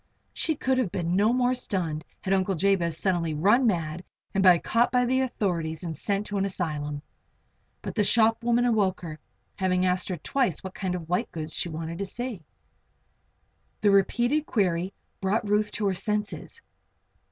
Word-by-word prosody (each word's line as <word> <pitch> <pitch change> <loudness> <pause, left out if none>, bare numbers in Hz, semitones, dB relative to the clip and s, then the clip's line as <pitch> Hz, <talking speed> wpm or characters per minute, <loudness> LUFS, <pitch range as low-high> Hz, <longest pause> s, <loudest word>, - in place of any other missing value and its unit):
She 315 - -1
could 260 -1 +1
have 220 -9 0
been 175 -1 -1
no 210 +4 +4
more 250 0 +2
stunned 170 -10 -2 0.2
had 190 - 0
Uncle 190 0 +1
Jabez 170 -2 +2
suddenly 170 -5 0
run 210 - +4
mad 170 -3 -1 0.3
and 195 - +2
been 180 -3 +7
caught 235 +2 +2
by 250 -1 +3
the 260 +2 +2
authorities 170 -10 -2
and 165 -2 -4
sent 200 +6 -1
to 205 -1 -2
an 195 - +1
asylum. 150 -6 -3 0.8
But - - -4
the 210 - +2
shop 225 +2 +3
woman 240 +1 +3
awoke 205 -6 +1
her, 155 -3 -7 0.4
having 185 -1 +1
asked 180 +1 0
her 180 - -2
twice 215 - -1
what 190 0 -6
kind 185 -2 -2
of 170 -3 -6
white 175 +2 -1
goods 155 -1 -5
she 175 - -1
wanted 165 +1 -5
to 200 - -1
see. 235 -4 -5 1.4
The 205 - +4
repeated 240 +9 +2
query 185 -4 0 0.3
brought 200 +3 0
Ruth 210 +1 +2
to 210 - -2
her 195 - +2
senses. 210 - -3
195 Hz, 175 wpm, -27 LUFS, 170-225 Hz, 1.4 s, been